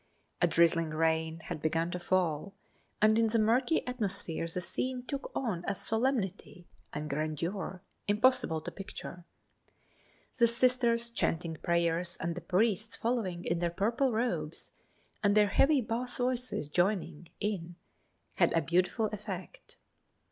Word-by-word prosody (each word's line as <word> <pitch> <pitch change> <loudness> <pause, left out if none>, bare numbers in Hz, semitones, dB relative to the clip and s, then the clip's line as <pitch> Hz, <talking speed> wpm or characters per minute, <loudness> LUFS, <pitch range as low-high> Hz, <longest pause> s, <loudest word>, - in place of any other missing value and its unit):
A - - +5
drizzling 165 -1 +3
rain 160 +1 0
had 155 - -6
begun 165 +2 0
to 180 - -3
fall, 180 0 0 0.5
and 215 +1 +6
in 225 - +4
the 225 +1 +1
murky 240 +8 +2
atmosphere 200 -9 -3
the 170 +2 -3
scene 250 +8 -2
took 280 +1 -5
on 210 -10 -1
a 200 - 0
solemnity 220 -7 -1 0.3
and 150 +1 -4
grandeur 165 +6 -3 0.2
impossible 210 -6 +3
to - - -6
picture. 180 -3 -8 1.1
The 235 - +7
Sisters 235 -1 +2
chanting 165 -7 -1
prayers 170 +1 0
and 170 0 -1
the 175 - -6
priests 210 +5 +1
following 215 -7 -2
in 170 0 0
their 175 0 +1
purple 230 +9 +1
robes, 235 +2 -2 0.5
and 205 -1 +3
their 210 -1 +5
heavy 275 +5 +4
bass 240 +2 -2
voices 250 - -1
joining 175 -1 0
in 175 -5 -3 0.6
had - - +4
a 165 - +3
beautiful 180 +6 +1
effect. 210 - -7
195 Hz, 135 wpm, -31 LUFS, 170-235 Hz, 1.1 s, The